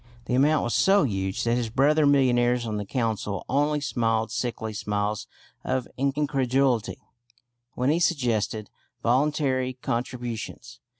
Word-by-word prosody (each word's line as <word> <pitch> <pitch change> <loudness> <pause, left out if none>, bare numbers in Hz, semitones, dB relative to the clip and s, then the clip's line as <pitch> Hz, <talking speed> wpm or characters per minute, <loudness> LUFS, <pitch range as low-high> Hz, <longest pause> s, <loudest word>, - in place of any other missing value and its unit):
The - - -3
amount 145 +4 +3
was 120 - -1
so 195 -1 +4
huge 95 -6 -2
that 115 - +1
his 120 -2 -2
brother 145 +5 +3
millionaires 125 -3 +3
on 110 -2 -3
the 105 -1 -5
Council 110 -5 -2
only 145 +3 +1
smiled 115 -5 0
sickly 115 -2 -3
smiles 105 0 -2 0.4
of 130 -1 -1
incredulity 135 -3 +1 0.8
when 125 +3 +1
he 165 - +2
suggested 115 - 0 0.3
"voluntary 130 0 +1
contributions." 120 0 -4
125 Hz, 125 wpm, -26 LUFS, 110-140 Hz, 0.8 s, so